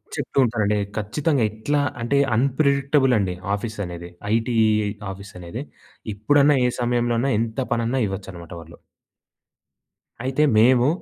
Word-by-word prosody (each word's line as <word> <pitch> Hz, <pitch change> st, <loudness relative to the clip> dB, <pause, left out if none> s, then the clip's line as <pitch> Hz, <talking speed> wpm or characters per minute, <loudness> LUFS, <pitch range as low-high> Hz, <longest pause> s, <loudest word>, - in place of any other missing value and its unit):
చెప్తూ -, -, -5 dB
ఉంటానండి. 105 Hz, -3 st, 0 dB, 0.2 s
ఖచ్చితంగా, 135 Hz, +6 st, 0 dB
ఎట్లా 145 Hz, +7 st, -1 dB, 0.2 s
అంటే 120 Hz, +4 st, +1 dB, 0.2 s
అన్‌ప్రిడిక్టబుల్ 140 Hz, +1 st, +2 dB
అండి 95 Hz, -3 st, -1 dB, 0.2 s
ఆఫీస్ 110 Hz, +2 st, -4 dB
అనేది. 85 Hz, 0 st, -8 dB, 0.2 s
ఐటీ 115 Hz, +1 st, 0 dB, 0.6 s
ఆఫీస్ 100 Hz, +1 st, -11 dB
అనేది. 90 Hz, +9 st, -6 dB, 0.5 s
ఎప్పుడన్నా 145 Hz, +6 st, +4 dB
ఏ -, -, +1 dB
సమయంలోన్నా 120 Hz, +1 st, +1 dB
ఎంత 115 Hz, +2 st, -2 dB
పనన్నా 120 Hz, +3 st, 0 dB
ఇవ్వచ్చనమాట 95 Hz, -3 st, -8 dB
వాళ్ళు. 85 Hz, +1 st, -14 dB, 1.5 s
అయితే, 135 Hz, +3 st, +1 dB, 0.2 s
మేము 125 Hz, +2 st, +5 dB
115 Hz, 115 wpm, -22 LUFS, 100-135 Hz, 1.5 s, మేము